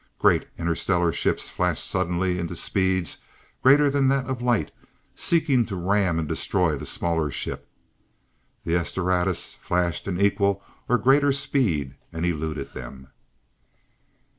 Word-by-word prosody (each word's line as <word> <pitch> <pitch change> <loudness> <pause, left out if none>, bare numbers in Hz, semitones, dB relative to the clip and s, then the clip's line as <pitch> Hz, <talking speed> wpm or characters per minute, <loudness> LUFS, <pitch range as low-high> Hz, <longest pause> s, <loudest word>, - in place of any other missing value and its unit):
Great - - +3
interstellar 85 0 0
ships - - 0
flashed - - -1
suddenly 90 0 0
into 85 -1 -4
speeds 95 -2 0 0.4
greater 145 +3 +6
than 140 -1 +2
that 135 -1 +2
of 130 -1 -4
light, 120 -3 +1 0.4
seeking 155 -7 +2
to 105 -3 -5
ram 95 -1 +1
and 80 -2 -1
destroy 90 0 0
the - - -6
smaller 80 -3 0
ship. - - -5 1.0
The 85 - 0
"S 85 - -2
Doradus" 90 -1 0
flashed 90 -1 -2
into 95 +1 +1
equal 100 -1 +1 0.3
or 125 - +4
greater 140 +5 +4
speed, 120 - 0 0.2
and 80 +1 -3
eluded 75 -4 -3
them. 65 +2 -9
90 Hz, 135 wpm, -24 LUFS, 85-120 Hz, 1.0 s, greater